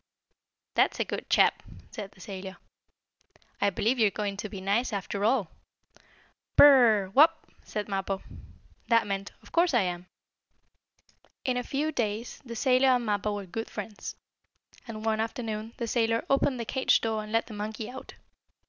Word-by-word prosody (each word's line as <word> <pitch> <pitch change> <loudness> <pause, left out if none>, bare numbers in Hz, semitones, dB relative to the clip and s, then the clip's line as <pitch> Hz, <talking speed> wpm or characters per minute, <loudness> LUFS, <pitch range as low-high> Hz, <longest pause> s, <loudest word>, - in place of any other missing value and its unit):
"That's - - +2
a - - +1
good - - -5
chap!" - - +4 0.3
said 200 -2 -7
the 185 - -18
sailor. 190 0 -7 1.0
"I 200 - +4
believe 225 +6 0
you 220 - +5
are - - +2
going 200 -1 -3
to 210 +1 -5
be 195 - -7
nice 205 +7 0
after 200 0 -3
all." 220 -5 +2 1.0
"Bur - - +10
r 290 - +10
r 225 -6 +5
r! 190 - -9
Wopp!" 295 +9 +5 0.2
said 210 -1 -4
Mappo. 195 -1 -2 0.6
That 230 -2 +4
meant: 195 0 -3
"Of - - -16
course 340 -4 +3
I 235 - +5
am!" 180 -1 -3 1.4
In 255 -2 +1
a 250 - 0
few 285 +5 -2
days 225 -3 -3
the 235 -3 -8
sailor 255 +2 +3
and 250 -2 +3
Mappo 210 0 0
were 200 -1 -5
good 225 +5 -5
friends, 210 0 -7 0.7
and 220 -1 -7
one 220 -1 +1
afternoon 225 0 -4
the 235 - -2
sailor 230 0 +1
opened 275 -2 +2
the 235 - -3
cage 265 +3 +2
door 220 -1 -1
and 215 0 -9
let 225 +1 +2
the 225 - -10
monkey 215 +1 -5
out. 260 +2 -10
220 Hz, 175 wpm, -28 LUFS, 205-245 Hz, 1.4 s, Bur